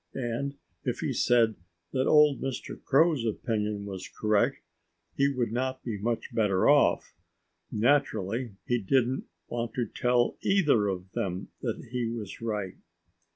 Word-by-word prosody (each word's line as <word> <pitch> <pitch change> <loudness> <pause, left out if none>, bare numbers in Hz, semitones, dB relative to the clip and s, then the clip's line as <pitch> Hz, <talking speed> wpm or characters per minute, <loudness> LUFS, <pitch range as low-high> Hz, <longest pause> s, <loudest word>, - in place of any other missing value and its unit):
And 135 +2 -2 0.3
if - - -2
he - - -1
said 115 -2 +3 0.4
that 130 0 +1
old 150 -2 +5
Mr. 135 -2 -5
Crow's 150 -1 +4
opinion 105 -2 -2
was 95 -2 -6
correct 105 -1 +1 0.6
he 140 - +3
would 125 -5 -1
not 130 +2 -2
be 110 -4 -4
much 115 +3 -2
better 100 -4 +2
off. - - +4 0.6
Naturally 115 -3 +1
he 120 0 +1
didn't 130 +5 +1 0.2
want 120 -1 -4
to 120 - 0
tell 125 0 +1
either 150 - +3
of 95 -1 -4
them 95 -2 -3
that - - -4
he 125 -2 -1
was 115 -4 -6
right. 105 -5 -3
120 Hz, 140 wpm, -28 LUFS, 105-130 Hz, 0.6 s, old